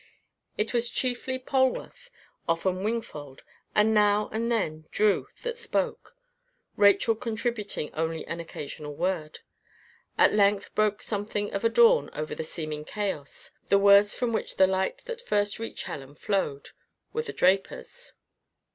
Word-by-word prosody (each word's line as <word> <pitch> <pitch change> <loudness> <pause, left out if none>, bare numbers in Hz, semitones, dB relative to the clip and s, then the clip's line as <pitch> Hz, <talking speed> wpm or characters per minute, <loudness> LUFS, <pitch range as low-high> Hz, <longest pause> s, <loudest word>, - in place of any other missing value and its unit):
It 210 +2 -1
was 240 0 +1
chiefly 255 +1 -1
Polwarth, 265 - -1 0.4
often 185 +3 0
Wingfold, 155 - -4 0.3
and 215 +1 +4
now 210 0 +3
and 230 +2 -1
then 155 -9 -1
Drew 210 -1 +2 0.2
that 480 0 -3
spoke, 470 - -2 0.6
Rachel 205 +3 +5
contributing 225 -6 -3
only 160 +1 -2
an 170 - -5
occasional 150 -2 -7
word. 165 -2 -2 0.8
At - - +5
length 205 -1 +2
broke 215 -1 +1
something 205 0 -2
of 200 - -2
a 230 - +4
dawn 475 - +5
over 155 0 -4
the - - -4
seeming 155 -2 -5
chaos. 190 -6 -5 0.2
The 200 - +6
words 200 +1 +6
from 245 -2 -1
which - - -2
the 190 - +6
light 190 - -1
that 475 -1 -6
first 205 - 0
reached 225 - -5
Helen 140 0 -7
flowed, 150 -7 -2 0.4
were 460 - 0
the 465 - -5
draper's. 195 - 0
205 Hz, 140 wpm, -27 LUFS, 170-230 Hz, 0.8 s, The